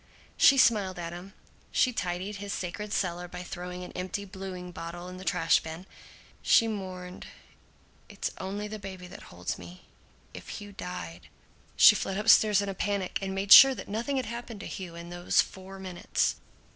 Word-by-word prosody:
She 275 Hz, -, +6 dB
smiled 205 Hz, -7 st, +3 dB
at 170 Hz, -1 st, -5 dB
him. 185 Hz, +3 st, -10 dB, 0.4 s
She 250 Hz, -, +2 dB
tidied 185 Hz, +1 st, -3 dB
his 200 Hz, 0 st, -6 dB
sacred 205 Hz, +4 st, -5 dB
cellar 180 Hz, -3 st, -1 dB
by 180 Hz, +1 st, -8 dB
throwing 180 Hz, 0 st, -7 dB
an -, -, -9 dB
empty 185 Hz, +3 st, -4 dB
bluing 190 Hz, -2 st, -7 dB
bottle 175 Hz, 0 st, -7 dB
into 185 Hz, 0 st, -9 dB
the 185 Hz, -2 st, -1 dB
trash 165 Hz, -, +3 dB
bin. 160 Hz, +3 st, -8 dB, 0.6 s
She 230 Hz, -, +5 dB
mourned, 185 Hz, -4 st, -6 dB, 0.8 s
"It's -, -, -4 dB
only 200 Hz, +2 st, -4 dB
the 215 Hz, 0 st, -7 dB
baby 190 Hz, -2 st, -8 dB
that 180 Hz, +3 st, -11 dB
holds 90 Hz, 0 st, -5 dB
me. 90 Hz, +1 st, -12 dB, 0.5 s
If -, -, -8 dB
Hugh 205 Hz, -1 st, -9 dB
died 90 Hz, -, -7 dB, 0.2 s
" -, -, -32 dB
She -, -, +9 dB
fled 195 Hz, -, -3 dB
upstairs 210 Hz, -1 st, +5 dB
in 200 Hz, -1 st, -3 dB
panic 200 Hz, -1 st, -2 dB
and 190 Hz, 0 st, -3 dB
made 195 Hz, +1 st, -3 dB
sure 270 Hz, -1 st, +11 dB
that -, -, -8 dB
nothing 235 Hz, +7 st, -2 dB
had 260 Hz, -, -1 dB
happened 235 Hz, -2 st, -7 dB
to -, -, -7 dB
Hugh 180 Hz, -3 st, -7 dB
in 170 Hz, +1 st, -9 dB
these 175 Hz, 0 st, 0 dB
four 190 Hz, 0 st, -2 dB
minutes. 185 Hz, -2 st, -1 dB
190 Hz, 180 wpm, -28 LUFS, 175-205 Hz, 0.8 s, sure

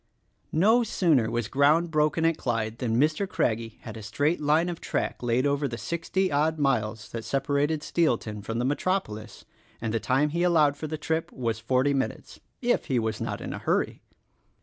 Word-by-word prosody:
No 220 Hz, +9 st, +5 dB
sooner 160 Hz, -, +2 dB
was 120 Hz, -2 st, -1 dB
ground 150 Hz, +6 st, +3 dB
broken 155 Hz, +1 st, +2 dB
at 165 Hz, 0 st, +3 dB
Clyde 115 Hz, -3 st, -2 dB
than 115 Hz, -2 st, 0 dB
Mr. 155 Hz, +7 st, +1 dB
Crag 115 Hz, -2 st, +1 dB
gie 115 Hz, -1 st, -9 dB
had 110 Hz, -, -8 dB
a 110 Hz, -, -7 dB
straight 145 Hz, +11 st, 0 dB
line 155 Hz, +3 st, +3 dB
of 175 Hz, -2 st, -5 dB
track -, -, -2 dB
laid 120 Hz, +2 st, +1 dB
over 140 Hz, 0 st, +1 dB
the 120 Hz, -2 st, -5 dB
sixty 175 Hz, +5 st, -1 dB
odd 155 Hz, +3 st, +1 dB
miles 115 Hz, -7 st, 0 dB
that 115 Hz, -1 st, -5 dB
separated 140 Hz, +3 st, 0 dB
Steelton 115 Hz, -10 st, 0 dB
from 115 Hz, +2 st, -3 dB
the 120 Hz, -, 0 dB
metropolis; 140 Hz, -, -2 dB, 0.3 s
and 115 Hz, -1 st, -3 dB
the 115 Hz, -, +1 dB
time 135 Hz, +6 st, +1 dB
he 170 Hz, +3 st, -2 dB
allowed 160 Hz, -5 st, +4 dB
for 155 Hz, +1 st, -5 dB
the 155 Hz, +1 st, -4 dB
trip 160 Hz, +2 st, -2 dB
was 115 Hz, -4 st, -2 dB
forty 130 Hz, +5 st, +2 dB
minutes 135 Hz, -1 st, -3 dB
— -, -, -48 dB
if -, -, -2 dB
he 130 Hz, -, 0 dB
was 110 Hz, -2 st, -1 dB
not -, -, -3 dB
in -, -, -5 dB
a -, -, -5 dB
hurry. -, -, 0 dB
140 Hz, 195 wpm, -27 LUFS, 115-160 Hz, 0.3 s, No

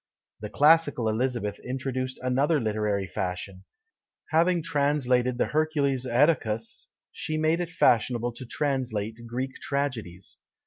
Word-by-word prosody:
The 105 Hz, -, -6 dB
classical 145 Hz, -5 st, +4 dB
Elizabeth 110 Hz, -2 st, -1 dB
introduced 130 Hz, 0 st, -4 dB
another 140 Hz, +5 st, +2 dB
literary 105 Hz, -3 st, -1 dB
fashion; 90 Hz, +1 st, -5 dB, 0.7 s
having 170 Hz, +1 st, +3 dB
translated 130 Hz, -4 st, +1 dB
the -, -, +2 dB
Hercules 145 Hz, -4 st, 0 dB
Oetacus, 120 Hz, -5 st, +1 dB, 0.2 s
she 155 Hz, -, -3 dB
made 155 Hz, +2 st, +2 dB
it 175 Hz, -1 st, -2 dB
fashionable 120 Hz, -5 st, +2 dB
to 120 Hz, +2 st, -9 dB
translate 115 Hz, -5 st, -2 dB
Greek 130 Hz, +3 st, -4 dB
tragedies. 115 Hz, -11 st, -3 dB
130 Hz, 115 wpm, -27 LUFS, 110-145 Hz, 0.7 s, classical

